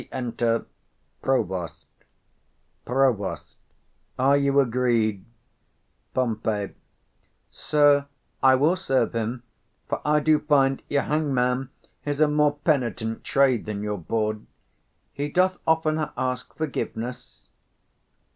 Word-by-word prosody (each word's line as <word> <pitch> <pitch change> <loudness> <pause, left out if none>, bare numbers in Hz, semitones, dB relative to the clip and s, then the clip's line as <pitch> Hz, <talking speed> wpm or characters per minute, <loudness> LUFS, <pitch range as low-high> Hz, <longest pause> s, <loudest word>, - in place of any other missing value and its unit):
Re - - -17
enter 120 -2 -1 0.6
PROVOST. 95 -10 -1 1.0
Prov. 125 -6 +1 0.7
Are 135 +2 +4
you 140 0 +3
agreed? 120 -5 +1 0.9
Pom. 115 -4 0 1.1
Sir, 145 -2 +3 0.3
I 130 0 +6
will 150 +7 +3
serve 135 -10 0
him; 115 +2 -3 0.4
for - - -3
I 150 0 +3
do 155 0 +3
find 135 -3 +2
your 140 -1 +1
hangman 135 -4 0 0.3
is 145 -1 -3
a 155 - +5
more 150 0 +2
penitent 120 - 0
trade 130 -5 +2
than 105 -1 -4
your 105 -1 -3
bawd; 110 +4 -2 0.7
he 145 +2 -3
doth 185 +4 +2
45 - - -38
oftener 155 -1 +1
ask 130 -1 -2
forgiveness. 125 -5 -5
130 Hz, 110 wpm, -25 LUFS, 115-145 Hz, 1.1 s, I